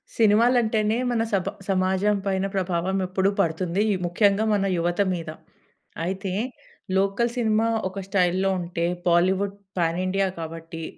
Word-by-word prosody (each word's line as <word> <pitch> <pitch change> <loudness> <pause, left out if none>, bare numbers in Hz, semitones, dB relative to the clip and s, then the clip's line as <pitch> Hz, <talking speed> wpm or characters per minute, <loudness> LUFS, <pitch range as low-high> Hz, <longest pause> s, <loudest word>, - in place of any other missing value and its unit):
సినిమాలు 230 +3 +4
అంటేనే 220 0 +1
మన 235 -2 +1
సబ 190 -2 +1 0.2
సమాజం 190 +2 +2
పైన 190 -1 0
ప్రభావం 185 0 0
ఎప్పుడు 190 +1 +1
పడుతుంది. 175 +4 +1 0.2
ముఖ్యంగా 200 +4 +2
మన 200 -1 +1
యువత 175 +3 0
మీద. 165 -3 -5 0.8
అయితే 190 +1 -3 0.7
లోకల్ 200 +5 +1
సినిమా 220 -1 +2 0.2
ఒక 195 +1 -6
స్టైల్‌లో 190 0 +2
ఉంటే 170 -1 -2 0.2
బాలీవుడ్ 190 +3 +2 0.2
పాన్ 165 -1 +1
ఇండియా 195 +1 +1
కాబట్టి 165 0 -7
190 Hz, 125 wpm, -24 LUFS, 175-205 Hz, 0.8 s, సినిమాలు